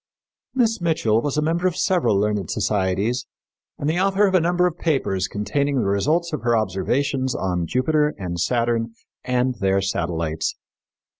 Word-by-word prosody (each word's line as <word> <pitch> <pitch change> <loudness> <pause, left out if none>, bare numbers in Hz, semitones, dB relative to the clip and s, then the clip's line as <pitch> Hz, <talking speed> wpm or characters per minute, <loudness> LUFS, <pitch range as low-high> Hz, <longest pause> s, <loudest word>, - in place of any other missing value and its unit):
Miss 225 -5 +1
Mitchell 135 -10 +2
was 145 +2 -2
a 150 - +2
member 170 +3 +1
of 180 - -1
several 180 - +2
learned 105 -3 0
societies 100 +4 0 0.5
and 145 - -3
the 165 +3 +1
author 195 +2 +3
of 190 - +1
a 185 - +5
number 175 +2 +2
of 175 -1 -2
papers 100 - 0
containing 140 +9 -1
the 125 - +1
results 155 - +1
of 150 - -2
her 120 -1 +2
observations 125 +7 0
on 90 -3 -1
Jupiter 150 - +1
and 90 -3 -4
Saturn 115 +1 0 0.3
and 125 0 +1
their 95 -1 +2
satellites. 85 -4 -2
125 Hz, 160 wpm, -22 LUFS, 100-160 Hz, 0.5 s, a